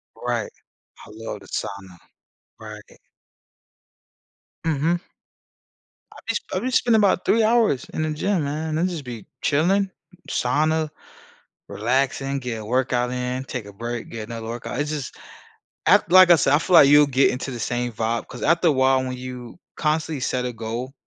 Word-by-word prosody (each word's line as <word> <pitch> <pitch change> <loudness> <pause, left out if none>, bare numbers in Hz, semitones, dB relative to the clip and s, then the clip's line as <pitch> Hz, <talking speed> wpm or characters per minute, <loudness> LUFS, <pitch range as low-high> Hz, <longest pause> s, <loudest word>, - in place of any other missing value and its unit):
Right. - - -3 0.5
I - - -15
love 115 +1 -7
the - - -16
sauna. 95 -2 -6 0.6
Right. 105 -1 -11 1.6
Mhm. 165 +2 0 1.1
I - - -15
bee - - -1 0.2
I - - 0
been 255 - -2
spending 235 -2 +3
about 200 -3 +2
3 225 0 +3
hours 220 - +2
in 155 - -1
the 155 - -1
gym, 170 +3 0
man, 155 +2 -2
I'll 170 - +1
just 175 -5 -3
be 120 -5 -8 0.2
chilling, 190 +7 +2 0.4
sauna, 155 +5 +1 0.8
relaxing, 135 +4 0
get 120 -3 -4
a - - -9
workout 125 +1 0
in, 125 +1 -3
take 125 -5 -6
a 100 - -10
break, 120 +3 -6
get 110 -2 -7
another 115 -1 -6
workout, 120 +3 -5
it's 150 +1 -1
just 145 -5 -5 0.7
ac - - +6
Like 185 0 +8
I - - +9
said, 140 -3 +2
I 145 - +5
feel 180 +2 +2
like 140 -4 +8
you'll 145 0 +7
get 135 0 +3
into 130 +1 -4
the 120 - -6
same 120 +1 -2
vibe, 115 +1 -2
‘cause - - -8
after 170 +3 +3
a - - +4
while, 130 -1 +3
when 130 -1 -4
you 125 +2 -8 0.2
constantly 155 -1 -1
set 125 -1 -1
a 125 - -3
goal 115 +3 -5
135 Hz, 170 wpm, -23 LUFS, 120-155 Hz, 1.6 s, I